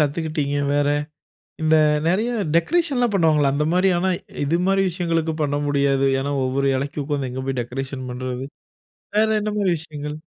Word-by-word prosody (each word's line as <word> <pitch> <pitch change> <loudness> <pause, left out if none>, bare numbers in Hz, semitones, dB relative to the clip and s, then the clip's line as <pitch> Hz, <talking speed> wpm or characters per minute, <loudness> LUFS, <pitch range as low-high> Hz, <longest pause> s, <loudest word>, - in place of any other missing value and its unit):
கத்துக்குட்டீங்க? 150 -1 -1 0.2
வேற 145 0 +2 0.7
இந்த 160 0 +4 0.3
நெறைய 210 +7 +1 0.3
டெக்கரேஷன்லாம் 255 - +2
பண்ணுவாங்கல்ல 155 -6 +3
அந்த 150 +1 0
மாரி 185 +1 +3
ஆனா, 185 +2 +1 0.4
இது 160 - +1
மாரி 195 0 +3
விஷயங்களுக்கு 165 -2 -1
பண்ண 145 -1 0
முடியாது. 140 -1 +2 0.2
ஏனா, 140 +1 -2
ஒவ்வொரு 135 +2 0
இலைக்குக்கும் 140 +2 -3
உட்கார்ந்து 140 -3 -2
எங்க 130 +1 -5
போய் 130 -2 -1
டெக்கரேஷன் 130 +2 -5
பண்றது. 125 +1 -4 0.7
வேற 220 +1 +4
என்ன 215 0 -2
மாரி 195 -3 +2
விஷயங்கள்? 150 -2 -7
150 Hz, 150 wpm, -22 LUFS, 140-175 Hz, 0.7 s, இந்த